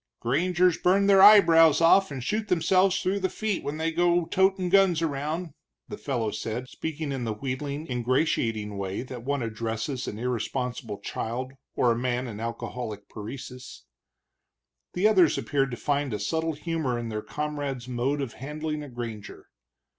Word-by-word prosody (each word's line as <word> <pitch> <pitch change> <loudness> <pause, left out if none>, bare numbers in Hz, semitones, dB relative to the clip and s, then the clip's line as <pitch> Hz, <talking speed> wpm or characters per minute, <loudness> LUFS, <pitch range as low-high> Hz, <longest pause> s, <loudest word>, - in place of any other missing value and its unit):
"Grangers 175 +7 +2
burn 195 +2 +3
their 195 -1 +6
eyebrows 165 -7 +8
off 180 +4 +5
and 135 -4 -6
shoot 215 - -1
theirselves 185 +2 +3
through 195 +2 0
the 190 -1 0
feet 215 -1 -2
when 145 +2 -4
they 160 +1 -1
go 175 +1 +2
totin' 190 0 +2
guns 190 -3 +4
around," 155 +3 -2 0.4
the 210 - -5
fellow 120 -7 -2
said, 115 +5 -4
speaking 155 +2 -5
in 135 -2 -3
the 110 -2 -2
wheedling, 140 +5 -4
ingratiating 120 -5 0
way 95 +3 -3
that 125 -2 -8
one 140 0 -1
addresses 115 +3 -3
an 105 - -5
irresponsible 125 -1 -3
child 130 +4 -4 0.2
or 120 - +3
a - - +1
man 125 +1 -1
in 110 -3 -7
alcoholic 115 -2 -5
paresis. 125 - -9 1.1
The 190 +4 +3
others 185 -7 +4
appeared 135 -1 0
to 120 - -5
find 145 -2 -1
a - - -4
subtle 160 +10 -1
humor 155 -5 -2
in 120 -1 -4
their 105 -1 -3
comrade's 145 -3 -4
mode 130 +4 -1
of 120 - -6
handling 150 +3 -5
a 145 - -8
granger. 115 -4 -8
140 Hz, 160 wpm, -26 LUFS, 120-165 Hz, 1.1 s, eyebrows